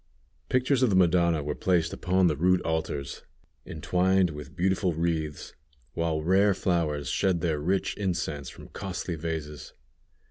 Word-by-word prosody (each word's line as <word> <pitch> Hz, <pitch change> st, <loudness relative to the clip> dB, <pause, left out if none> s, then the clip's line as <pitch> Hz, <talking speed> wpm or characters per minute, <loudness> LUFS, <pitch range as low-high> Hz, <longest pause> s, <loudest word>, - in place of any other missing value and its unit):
Pictures 130 Hz, +1 st, +2 dB
of 130 Hz, -, +4 dB
the 100 Hz, -, +2 dB
Madonna 85 Hz, -3 st, +3 dB
were 75 Hz, +1 st, -2 dB
placed 85 Hz, 0 st, +1 dB
upon 95 Hz, -1 st, +1 dB
the 80 Hz, -4 st, +3 dB
rude 90 Hz, +5 st, +3 dB
altars, 80 Hz, -4 st, -3 dB, 0.5 s
entwined 90 Hz, +3 st, +1 dB
with 75 Hz, -2 st, -9 dB
beautiful 95 Hz, 0 st, +1 dB
wreaths, 80 Hz, -2 st, -2 dB, 0.4 s
while 80 Hz, -2 st, -1 dB
rare 95 Hz, +3 st, +3 dB
flowers 80 Hz, -7 st, -1 dB
shed 90 Hz, +4 st, +1 dB
their 80 Hz, -4 st, 0 dB
rich 95 Hz, +6 st, 0 dB
incense 85 Hz, -8 st, -2 dB
from -, -, -13 dB
costly 95 Hz, -2 st, -5 dB
vases. 80 Hz, -2 st, -5 dB
85 Hz, 140 wpm, -27 LUFS, 75-95 Hz, 0.5 s, of